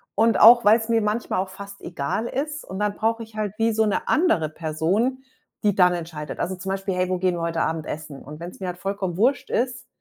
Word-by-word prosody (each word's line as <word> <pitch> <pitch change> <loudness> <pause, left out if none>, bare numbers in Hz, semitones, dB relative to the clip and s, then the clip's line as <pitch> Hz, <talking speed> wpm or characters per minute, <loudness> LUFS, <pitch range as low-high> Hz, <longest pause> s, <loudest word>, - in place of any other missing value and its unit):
Und 225 +1 +3
auch, 235 +2 +9
weil's 220 +2 +4
mir 230 -1 +3
manchmal 210 -1 -1
auch 190 0 -2
fast 200 +1 -10
egal 170 +7 -3
ist. 295 +4 -3
Und 190 - -7
dann 210 -1 0
brauche 225 +1 0
ich 220 -1 -15
halt 210 -2 -2
wie 225 0 +2
so 220 0 +2
'ne 210 - -1
andere 300 - +2
Person, 170 - -1 0.4
die 205 -2 +2
dann 180 -2 +5
entscheidet. 160 -3 -6
Also, 190 +2 -2
zum 190 +1 -7
Beispiel: 195 0 -2
„Hey, 180 0 0
wo 185 - 0
gehen 180 -1 +1
wir 170 - -4
heute 165 -1 -1
Abend 160 -1 -1
essen?“ 150 -2 -7
Und 150 +2 -10
wenn's 175 +2 -8
mir 190 - -4
halt 180 0 -4
vollkommen 195 -3 -3
Wurst 250 +7 +1
ist, 245 0 -1
195 Hz, 235 wpm, -23 LUFS, 175-225 Hz, 0.4 s, auch